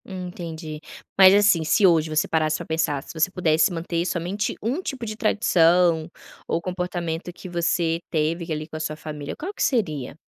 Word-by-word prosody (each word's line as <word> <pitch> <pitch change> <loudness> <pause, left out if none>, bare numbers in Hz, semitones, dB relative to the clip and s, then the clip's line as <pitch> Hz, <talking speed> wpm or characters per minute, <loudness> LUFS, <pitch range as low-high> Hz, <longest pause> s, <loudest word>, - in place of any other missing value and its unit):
Entendi. 170 -4 -7 0.4
Mas, 190 -1 +9
assim, 200 -5 +4
se 160 +6 +3
hoje 165 -3 +4
você 155 0 +1
parasse 155 -1 +1
pra - - -8
pensar, 150 -3 -1
se - - -11
você 160 +2 +1
pudesse 165 -3 +2
manter 170 0 -2
somente 180 +4 -2
1 250 - -1
tipo 270 -9 -5
de 215 -1 -5
tradição 175 -6 +3 0.4
ou 165 - 0
comportamento 180 -2 -4
que 175 +1 -11
você 170 -1 0
teve 165 +2 -1
que 165 - -2
ali 155 0 -5
com 160 - -10
a - - -4
sua 155 -1 -3
família, 150 -2 -7
qual 375 +6 -6
que - - -8
seria? 155 - -1
170 Hz, 185 wpm, -23 LUFS, 155-185 Hz, 0.4 s, Mas